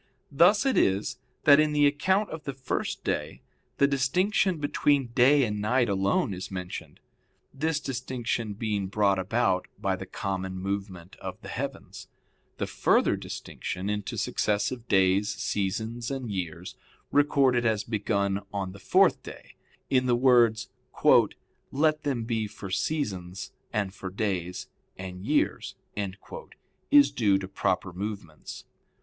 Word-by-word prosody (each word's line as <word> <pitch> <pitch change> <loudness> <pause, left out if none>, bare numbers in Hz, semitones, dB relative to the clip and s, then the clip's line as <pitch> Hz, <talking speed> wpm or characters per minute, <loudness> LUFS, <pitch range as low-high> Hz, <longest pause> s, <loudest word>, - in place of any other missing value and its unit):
Thus 180 - +5
it 270 - +2
is, 105 +6 +1 0.2
that 145 0 +7
in 155 0 +3
the 145 0 +4
account 190 +9 +2
of 160 -1 -6
the 140 - -4
first 130 -1 -3
day - - -3 0.3
the 140 - +5
distinction 175 +8 +1
between 145 -3 +1
day 135 +4 +5
and 105 -3 -2
night 120 +2 +2
alone 100 +1 +1
is 95 +1 -6
mentioned; 90 -2 -7 0.5
this 155 +2 0
distinction 120 -5 -3
being 105 -2 -2
brought 100 -1 +2
about 95 -1 +1
by - - 0
the - - -8
common 95 -1 -4
movement 95 -2 -5
of - - -7
the - - -8
heavens. - - -6 0.5
The - - -1
further - - +2
distinction 95 +3 -5
into 105 -1 -3
successive 105 +4 -1
days, 95 +1 +3
seasons, 110 +4 -2
and 130 -5 -4
years 90 -2 -5 0.4
recorded 135 -4 +3
as 110 -3 +1
begun 100 -2 -1
on 95 -2 -3
the 100 - -12
fourth - - +3
day, - - -11 0.3
in 130 -1 +2
the 120 - +4
words, 120 -3 +4 1.0
"let 155 +2 +2
them 135 -6 -1
be 110 -2 -1
for 100 -2 -9
seasons, 95 - -2 0.2
and 100 -4 -1
for 95 -1 -6
days, 90 -3 -3 0.3
and 95 0 -7
years" - - 0 1.1
is 290 0 +6
due 105 -7 +3
to 95 -1 -5
proper 95 -1 -1
movements. 100 -4 -7
110 Hz, 135 wpm, -27 LUFS, 95-135 Hz, 1.1 s, that